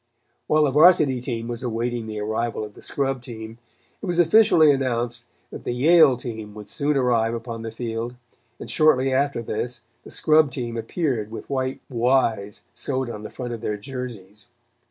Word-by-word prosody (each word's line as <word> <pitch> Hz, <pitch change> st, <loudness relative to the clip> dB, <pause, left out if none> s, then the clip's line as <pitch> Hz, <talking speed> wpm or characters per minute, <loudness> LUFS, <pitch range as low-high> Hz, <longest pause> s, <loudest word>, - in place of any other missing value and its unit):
While 155 Hz, 0 st, +4 dB
the 145 Hz, -, +2 dB
Varsity 150 Hz, -4 st, +5 dB
team 115 Hz, -2 st, -4 dB
was 120 Hz, 0 st, -5 dB
awaiting 120 Hz, -1 st, -2 dB
the 110 Hz, -1 st, -5 dB
arrival 110 Hz, +1 st, -2 dB
of 105 Hz, -, -12 dB
the -, -, -15 dB
scrub 135 Hz, -2 st, -2 dB
team, 115 Hz, -1 st, -9 dB, 0.4 s
it 200 Hz, -, -5 dB
was 175 Hz, -1 st, -1 dB
officially 175 Hz, -3 st, +6 dB
announced 120 Hz, -3 st, -1 dB, 0.3 s
that -, -, -8 dB
the -, -, -2 dB
Yale 145 Hz, -1 st, +6 dB
team 110 Hz, -4 st, -7 dB
would 105 Hz, -1 st, -9 dB
soon 145 Hz, 0 st, 0 dB
arrive 120 Hz, -3 st, +2 dB
upon 115 Hz, -1 st, -6 dB
the 115 Hz, -, -5 dB
field, 115 Hz, +1 st, -4 dB, 0.4 s
and -, -, -7 dB
shortly 135 Hz, -4 st, +3 dB
after 140 Hz, -2 st, 0 dB
this, 120 Hz, +2 st, -4 dB, 0.2 s
the -, -, -12 dB
scrub 155 Hz, -1 st, +3 dB
team 120 Hz, -2 st, -4 dB
appeared 115 Hz, -, -2 dB
with 115 Hz, +5 st, -8 dB
white 130 Hz, -1 st, -2 dB
"Y's" 115 Hz, -5 st, 0 dB
sewed 130 Hz, -3 st, -2 dB
on 105 Hz, -, -7 dB
the 110 Hz, -, -7 dB
front 125 Hz, -2 st, -6 dB
of 115 Hz, -, -6 dB
their 105 Hz, -2 st, -2 dB
jerseys. 105 Hz, -4 st, -8 dB
120 Hz, 175 wpm, -23 LUFS, 115-135 Hz, 0.4 s, officially